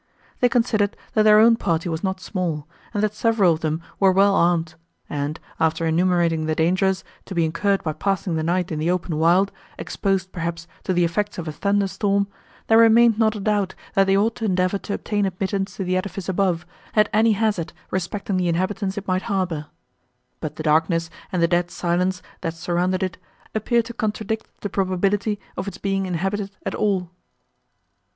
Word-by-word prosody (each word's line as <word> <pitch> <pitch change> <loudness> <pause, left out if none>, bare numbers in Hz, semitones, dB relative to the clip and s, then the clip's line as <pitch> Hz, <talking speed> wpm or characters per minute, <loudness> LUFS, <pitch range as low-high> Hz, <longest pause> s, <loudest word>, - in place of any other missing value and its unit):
They 245 - +4
considered, 230 -4 +1 0.2
that 215 - +4
their 215 0 +7
own 230 +1 +6
party 170 -4 0
was 160 +1 -3
not 190 -1 -1
small, 170 -6 -3 0.2
and 210 -2 -1
that 215 -1 +1
several 215 -5 +3
of 155 - -4
them 160 +1 -2 0.2
were 195 -1 +5
well 195 +2 +4
armed; 170 -3 +2 0.3
and, 145 +2 -3 0.2
after 160 0 +1
enumerating 165 -1 +2
the 155 - 0
dangers, 185 +4 +1 0.2
to 190 - -7
be 170 -1 +3
incurred 195 +5 0
by 155 -3 -1
passing 195 +2 -1
the 160 - 0
night 175 +2 0
in 155 - -2
the 160 +2 0
open 180 -3 -1
wild, 180 +5 +4 0.3
exposed, 190 -1 -1
perhaps, 170 -1 -4 0.2
to 185 - +1
the 175 0 +3
effects 205 +5 -1
of 170 -2 -5
a - - -2
thunder 200 +6 +1
storm, 200 +1 0 0.4
there 225 0 +5
remained 230 0 +6
not 220 -1 +3
a - - -4
doubt, 200 -2 0 0.2
that 195 - +4
they 195 0 +4
ought 220 +3 +2
to 225 - -3
endeavour 185 0 +1
to 200 - -4
obtain 205 -2 -1
admittance 195 +1 -2
to 195 - -2
the 185 0 0
edifice 185 0 -3
above, 185 -3 0 0.3
at 210 -1 +5
any 220 +1 +4
hazard 205 -6 0 0.2
respecting 190 +2 -2
the 180 -1 +1
inhabitants 190 +3 -1
it 200 - -5
might 185 0 +1
harbour; 180 -6 -1 0.7
but - - -5
the - - -5
darkness, 165 +2 +2 0.2
and 180 -2 +1
the - - +5
dead 175 0 +1
silence, 180 +1 -1 0.2
that 165 0 -3
surrounded 180 +2 0
it, 185 -2 -3 0.3
appeared 230 +2 +1
to 235 - -7
contradict 220 -1 -2
the - - -2
probability 195 +2 0 0.2
of - - -4
its 200 - -5
being 195 -1 -1
inhabited 195 +3 -2 0.2
at - - -2
all. 190 -5 0
185 Hz, 190 wpm, -23 LUFS, 170-205 Hz, 0.7 s, their